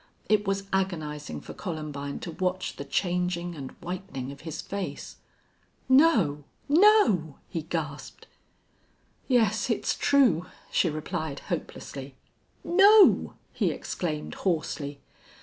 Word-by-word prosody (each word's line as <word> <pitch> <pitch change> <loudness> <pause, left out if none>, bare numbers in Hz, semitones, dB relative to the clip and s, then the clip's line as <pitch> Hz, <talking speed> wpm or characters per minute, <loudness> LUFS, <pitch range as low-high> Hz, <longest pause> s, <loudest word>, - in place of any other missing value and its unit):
It 210 -1 +2
was 195 0 0
agonizing 155 -6 -2
for - - -9
Columbine 150 -5 -5
to 170 - -5
watch 185 +2 -2
the 140 - -6
changing 175 +1 -1
and 140 -5 -7
whitening 170 -7 -5
of 140 - -11
his 160 -1 -6
face! 200 -1 -5 0.7
"No 230 - +4 0.2
no!" 285 - +4
he 165 - -4
gasped. 155 -2 -5 1.0
"Yes, 220 -5 +2
it's - - 0
true," 235 - +3 0.2
she 175 - +3
replied, 155 -1 -4
hopelessly. 135 -1 -5 0.5
"No!" 395 +4 +6 0.2
he - - +1
exclaimed, 155 -4 -4
hoarsely. 155 -5 -2
175 Hz, 110 wpm, -27 LUFS, 150-200 Hz, 1.0 s, No